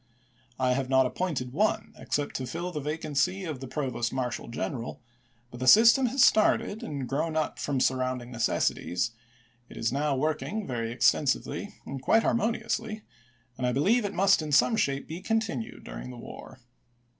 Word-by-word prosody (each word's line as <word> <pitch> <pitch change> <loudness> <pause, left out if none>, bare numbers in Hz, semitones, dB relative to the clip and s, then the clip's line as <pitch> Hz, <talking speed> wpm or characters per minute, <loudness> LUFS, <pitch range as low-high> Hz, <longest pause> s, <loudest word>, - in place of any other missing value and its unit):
I 130 -1 +2
have 130 0 -2
not 130 -1 +4
appointed 130 -4 -2
one, 215 +5 0
except 145 -1 -2
to 130 - -4
fill 175 +5 -4
the 155 - -4
vacancy 155 +5 -1
of 155 -6 -4
the 135 - -7
provost 125 -4 -2
marshal 125 -2 -3
general; 115 +1 -4 0.5
but 120 - -9
the 130 - -2
system 235 - +7
has 260 +2 +3
started 215 0 +3
and 140 -4 -4
grown 155 +4 -1
up 155 - -1
from 140 -2 -1
surrounding 130 -1 0
necessities; 115 -3 0 0.6
it - - -11
is 115 - 0
now 140 +1 0
working 155 +9 -2
very 115 -3 -3
extensively 125 +3 +1
and 135 -1 -6
quite 225 +10 +3
harmoniously, 220 -1 -1 0.6
and 125 - 0
I 125 - 0
believe 210 - +3
it 205 0 -3
must 195 -2 +4
in 155 -1 -5
some 225 - +4
shape 140 -10 0
be 165 +3 -6
continued 220 - -2
during - - -8
the - - -9
war. - - -10
140 Hz, 165 wpm, -28 LUFS, 125-190 Hz, 0.6 s, system